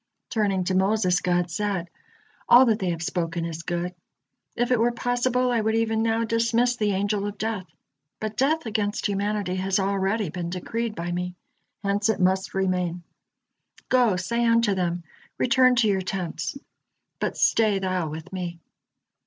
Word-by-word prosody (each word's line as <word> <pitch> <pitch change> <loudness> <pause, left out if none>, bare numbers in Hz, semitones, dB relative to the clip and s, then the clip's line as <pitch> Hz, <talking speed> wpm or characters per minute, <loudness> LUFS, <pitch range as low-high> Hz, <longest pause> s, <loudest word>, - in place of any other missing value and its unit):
Turning 200 -5 +1
to 185 - -1
Moses, 190 -1 +2
God 175 -1 0
said: 195 -2 -2 0.6
"All 250 +2 +9
that 225 -2 +2
they 185 - -1
have 165 -1 -2
spoken 165 -1 -2
is 165 -1 -5
good. 175 +1 -3 0.6
If 240 +1 0
it 245 - +4
were 235 +1 +3
possible, 245 +1 0
I 235 -2 +2
would 220 +1 +1
even 225 -1 +1
now 225 0 +1
dismiss 230 +2 +2
the 210 -4 0
Angel 200 +1 0
of 205 0 -6
Death, 215 -4 -3 0.5
but 215 0 -4
death 300 +6 +1
against 210 -2 -1
humanity 200 -2 -1
has 190 0 0
already 195 +1 0
been 175 -1 -4
decreed 220 +5 -3
by 170 +1 -4
Me, 180 0 -3 0.5
hence 200 +2 +1
it 220 - +1
must 190 +1 +1
remain. 180 -2 0 0.9
Go, 245 -6 +4
say 235 +7 -1
unto 230 -2 +3
them: 175 -2 -1 0.3
'Return 255 +1 +4
to 235 -2 +3
your 195 -2 +2
tents,' 185 +7 -3 0.6
but - - -2
stay 215 -3 +3
thou 185 -4 -1
with 160 +4 -8
Me." 175 -2 -4
200 Hz, 160 wpm, -25 LUFS, 180-225 Hz, 0.9 s, All